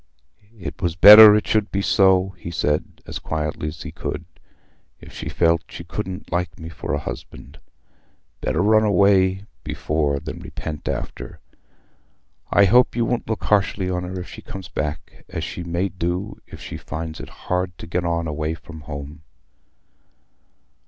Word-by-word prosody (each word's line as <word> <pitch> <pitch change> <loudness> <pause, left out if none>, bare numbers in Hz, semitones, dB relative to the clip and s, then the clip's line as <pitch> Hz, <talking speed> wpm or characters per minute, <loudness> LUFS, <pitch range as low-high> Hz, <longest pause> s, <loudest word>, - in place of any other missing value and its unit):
"It 85 - -7
was 85 -2 0
better 105 +3 +11
it 105 - +1
should 110 -1 +1
be 100 0 -1
so," 95 -2 +4
he 90 -3 -9
said, 75 -3 -2
as - - -6
quietly 75 -1 -3
as 75 - -6
he - - -7
could, 85 - -5 0.7
"if - - -14
she - - -6
felt 85 -1 +2
she 85 - -8
couldn't 95 +2 -6
like 85 -1 -2
me 80 0 -8
for 80 - -6
a - - +1
husband. - - -8 0.8
Better 85 - 0
run 110 +1 +5
away 95 -1 +3 0.2
before 75 -2 -1
than 80 +1 -7
repent 75 -2 -7
after. - - -5 1.1
I 100 - +5
hope 120 +6 +4
you 120 -1 +1
won't 120 -1 -2
look 110 - -2
harshly 100 -2 +1
on 90 -1 -1
her 90 +1 -5
if 90 - -7
she - - -10
comes 95 -4 -9
back, 75 -1 -5
as - - -4
she - - -5
may 85 +3 -1
do 90 +3 -3
if - - -11
she - - -7
finds 80 0 -6
it - - -8
hard 90 -1 -3
to - - -9
get 85 +2 -2
on 85 -1 -1
away 75 +1 -2
from 80 -1 -12
home." 75 0 -8
90 Hz, 165 wpm, -22 LUFS, 80-100 Hz, 1.1 s, better